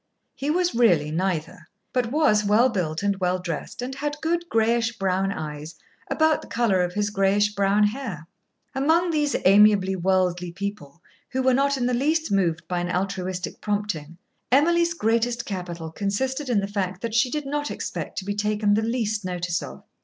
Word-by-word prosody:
He 280 +2 -4
was 355 +2 +1
really 175 -11 +3
neither, 165 -1 -2 0.3
but 245 -2 0
was 275 -8 +3
well 215 +5 +4
built 175 -6 -2
and 200 0 +1
well 180 0 +1
dressed, 180 +6 -5
and 260 +2 -4
had 295 +2 -4
good 340 +2 -1
grayish 230 +1 +1
brown 195 0 0
eyes, 150 -2 -6 0.3
about 315 -1 +2
the - - -12
colour 225 -6 +1
of 180 +1 -2
his 205 0 0
grayish 205 +1 +2
brown 200 +1 +2
hair. 210 - -2 0.5
Among 325 +6 +2
these 295 -2 +1
amiably 195 -1 +5
worldly 180 -1 0
people, 180 -5 -6 0.3
who 260 -1 -1
were 260 0 +4
not 280 +2 +2
in 245 - -1
the 250 - +1
least 310 +5 +1
moved 170 -4 0
by 180 -1 -1
an 175 0 -2
altruistic 185 0 -3
prompting, 205 -7 -3 0.3
Emily's 340 +5 +3
greatest 235 -1 0
capital 175 -4 -5
consisted 260 - -2
in 220 -5 +2
the - - -1
fact 190 -2 -3
that 230 -2 -4
she 240 +3 +3
did 300 +2 -3
not 290 +1 -2
expect - - -5
to 190 - -3
be 205 - -1
taken 210 0 +1
the 215 - +2
least 220 -2 -1
notice 180 -1 -2
of. 65 +1 -9
205 Hz, 180 wpm, -24 LUFS, 185-255 Hz, 0.5 s, amiably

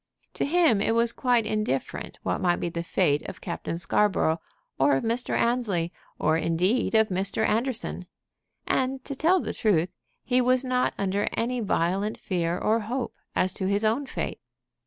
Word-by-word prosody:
To - - -1
him 305 - +3
it 225 - +1
was 230 0 +3
quite 240 -2 +2
indifferent 215 -11 -2
what - - -1
might 175 -1 +3
be 175 - -3
the 170 0 -3
fate 145 -3 +1
of - - -9
Captain 165 - -4
Scarborough, 170 -2 +1 0.4
or 135 +1 +4
of 135 - -1
Mr. 235 +2 0
Annesley, 210 -9 0 0.2
or 160 - +2
indeed 180 +10 +1
of 220 0 +4
Mr. 195 +3 0
Anderson. 230 -5 -1 0.6
And, 260 0 0
to 280 - -4
tell 335 +7 +3
the - - -3
truth, 180 -5 +2 0.3
he 255 0 +2
was 255 +1 +3
not 255 0 +1
under 200 +1 0
any 245 +2 -1
violent 195 0 0
fear 175 -2 -1
or 220 +4 +2
hope 235 +3 -3 0.2
as 185 0 +1
to 190 - -2
his 200 +2 +1
own 240 +6 +1
fate. - - -4
215 Hz, 170 wpm, -26 LUFS, 180-245 Hz, 0.6 s, or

